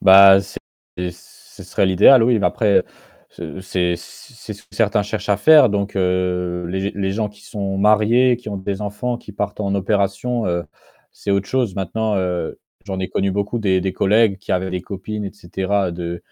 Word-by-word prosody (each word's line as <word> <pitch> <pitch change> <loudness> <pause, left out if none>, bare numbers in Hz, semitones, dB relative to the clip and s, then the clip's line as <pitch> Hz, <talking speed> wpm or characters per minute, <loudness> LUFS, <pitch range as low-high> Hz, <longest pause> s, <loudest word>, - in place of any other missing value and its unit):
Bah, 95 0 +8
c'est - - -9 0.5
ce 90 - -17
serait - - 0
l'idéal 105 +7 +6
oui, 120 0 +3
mais 100 - +2
après 105 -3 +2 0.5
ce - - -9
c 90 -2 -1
c'est 110 +5 -12
ce 105 - -16
que - - -21
certains 105 -2 +1
cherchent 105 0 -5
à 100 - +3
faire 150 +3 +6
donc 100 0 -2
heu, 90 -1 -1
les 95 +1 -3
g 100 +1 -2
les 95 -1 -2
gens 105 +1 -1
qui 105 0 -19
sont 100 -3 -4
mariés, 110 +5 +4
qui 120 -2 -10
ont 100 - -4
des 95 +1 -4
enfants 105 +4 -3
qui 105 - -12
partent 105 +1 -4
en 100 -1 -1
opération, 100 +4 -1
heu, 85 -1 -1 0.5
c'est 100 - -6
autre 100 0 +1
chose. 125 -7 0
Maintenant, 105 +3 -1
heu, 90 -3 -2 0.3
j'en 95 -2 -4
ai 95 - -3
connu 100 0 -1
beaucoup 100 +4 -2
des 95 -4 +1
des 95 0 -2
collègues 105 +1 +2
qui 100 - -10
avaient 95 +1 -1
des 90 0 -3
copines 105 +2 -6
et 100 - -6
cetera, 95 0 -2
d'1 85 0 -5
100 Hz, 200 wpm, -20 LUFS, 95-105 Hz, 0.5 s, Bah